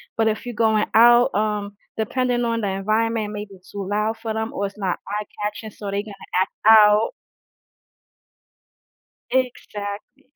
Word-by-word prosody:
but 225 -1 +2
if 220 +2 -1
you're 245 - -5
going 220 -1 +2
out, 240 +3 +6
um, 205 -1 -1 0.2
depending 245 +2 0
on 230 0 -1
the 205 - -1
environment, 215 +2 0
maybe 205 -1 -7
it's 185 -1 -19
too 200 -2 -5
loud 210 +2 0
for 225 - -3
them 220 +1 -3
or 200 0 -1
it's 200 - -13
not 190 -4 -2
eye-catching, 210 +1 -5
so 205 - -11
they're 200 +1 -1
gonna 210 -2 -10 0.3
act 190 - +1 0.2
out. 210 - +7 2.2
Exactly, 235 -1 -3
215 Hz, 150 wpm, -22 LUFS, 205-225 Hz, 2.2 s, out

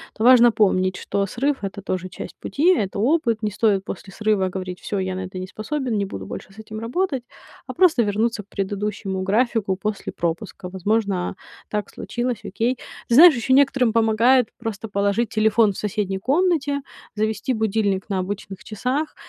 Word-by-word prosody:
то 215 - -3
важно 240 -1 +7
помнить, 185 -3 +2
что 200 - -1
срыв- 265 +4 -1
это 195 +1 -5
тоже 185 -1 -3
часть 185 - -8
пути, 340 +6 +2
это 200 - -2
опыт. 235 -3 +1
Не 210 - 0
стоит 205 -2 +2
после 195 +1 -7
срыва 210 -3 +1
говорить: 185 -1 -5
"Всё, 205 - -4
я 190 0 -2
на 185 0 -4
это 185 0 -8
не 185 - -4
способен, 240 +5 -3
не 200 - 0
буду 195 - -7
больше - - -8
с - - -21
этим 215 0 -7
работать", 265 +3 -1 0.4
а - - -5
просто 340 -8 +4
вернуться 215 +2 0
к - - -35
предыдущему 200 -1 -3
графику 210 0 +1
после 210 +2 -4
пропуска. 175 +3 -3
Возможно, 195 0 -1 0.3
так 210 -1 -2
случилось, 240 0 -3
окей. 235 +6 -1 0.3
Знаешь, 305 +6 +8
ещё 240 +3 +1
некоторым 265 -4 +4
помогает 230 +2 +4
просто 225 -2 -5
положить 200 +2 0
телефон 220 -1 +3
в - - -11
соседней 200 -2 -2
комнате, 285 - +1 0.3
завести 215 +3 -1
будильник 215 -3 0
на 195 -2 0
обычных 195 -2 -7
часах, 255 +8 -2
215 Hz, 170 wpm, -22 LUFS, 195-240 Hz, 0.4 s, Знаешь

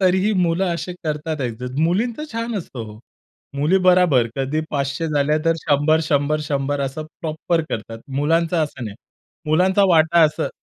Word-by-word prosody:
तरीही 190 +3 +3
मुलं 170 +2 +1
असे 170 +2 -5
करतात 155 0 -3
ॲडजस्ट, 125 0 -4
मुलींचं 220 - 0
छान 230 0 -3
असतं 135 -9 -7
हो. 105 0 -11 0.6
मुली 155 +7 +3
बराबर 180 -10 +5
कधी 135 +4 -1
500 140 +2 -2
झालं, 150 0 +1
तर 165 0 +3
100, 155 +1 +2
100, 145 +1 +1
100 140 0 -1
असं 140 +3 -3 0.2
प्रॉपर 165 +1 -1
करतात. 115 +1 -5 0.2
मुलांचं 165 +3 +1
असं 135 -4 -8
नाही. 105 -2 -7 0.5
मुलांचा 185 +5 +3
वाटा 165 0 +4
असं 150 0 0
155 Hz, 150 wpm, -21 LUFS, 140-170 Hz, 0.6 s, बराबर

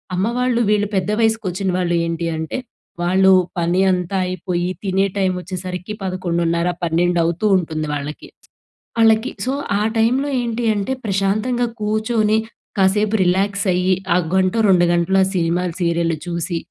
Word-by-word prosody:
అమ్మ 185 - +1
వాళ్ళు 250 -1 +1
వీళ్ళు 210 -1 +2
పెద్ద 190 +1 0
వయస్సుకొచ్చిన 205 -4 0
వాళ్ళు 175 -1 0
ఏంటి 165 0 -3
అంటే, 160 +9 -4 0.4
వాళ్ళు 190 +2 +4 0.3
పని 175 +2 +1
అంతా 180 +1 -1
అయిపోయి 180 -1 -2
తినే 195 0 +1
టైమొచ్చేసరికి 185 0 -3
11:30, 170 -2 -1 0.2
పన్నెండవుతూ 170 +2 +1
ఉంటుంది 155 -3 -3
వాళ్ళకి. 145 +1 -5 0.7
ఆళ్ళకి 225 +2 +4
సో, 260 - 0 0.3
ఆ - - -1 0.2
టైమ్‌లో 250 +6 +2
ఏంటి 235 0 -3
అంటే 205 +4 -2
ప్రశాంతంగా 210 +5 0
కూర్చొని 215 0 +1 0.4
కాసేపు 210 +3 +2
రిలాక్స్ 195 +3 +1
అయ్యి, 180 +1 +2 0.2
ఆ - - +2 0.2
గంటో 190 +3 +2
2:00 180 -2 +5
గంటలో 175 +3 +2
ఆ 190 - +1
సినిమాలు, 175 0 0
సీరియల్లు 170 -1 +1
చూసి, 170 0 -2
185 Hz, 135 wpm, -19 LUFS, 175-210 Hz, 0.7 s, 2:00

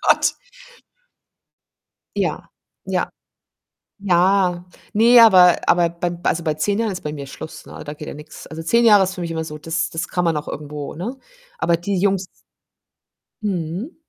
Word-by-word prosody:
Gott. - - +3 1.8
Ja, - - -2 0.4
ja. - - -1 0.9
Ja, 180 -1 +2 0.3
ne, 235 +3 +6
aber 180 -6 +7
aber 175 -1 +4
bei 170 0 -4
also 170 - 0
bei 155 -2 0
10 200 +7 0
Jahren 225 -2 0
ist 185 - -5
bei 150 0 -5
mir 140 -2 -7
Schluss, 155 +3 -9
ne, - - -10
da 150 - -5
geht 150 0 -9
ja - - -6
nix. 150 +1 -11
Also 160 +1 -8
10 235 +9 +2
Jahre 210 -4 +7
ist 185 0 -5
für 180 - -6
mich 170 -1 -4
immer 160 -1 -3
so 150 -1 -7
das 160 +1 -2
das 165 +2 -4
kann 180 -1 -1
man 165 - +2
noch 150 - -4
irgendwo, 150 -1 -6
ne? 215 - -5 0.4
Aber 170 -1 +2
die 190 +3 -2
Jungs 195 0 +1 1.2
Mhm. 185 - -3
175 Hz, 170 wpm, -21 LUFS, 160-195 Hz, 1.8 s, aber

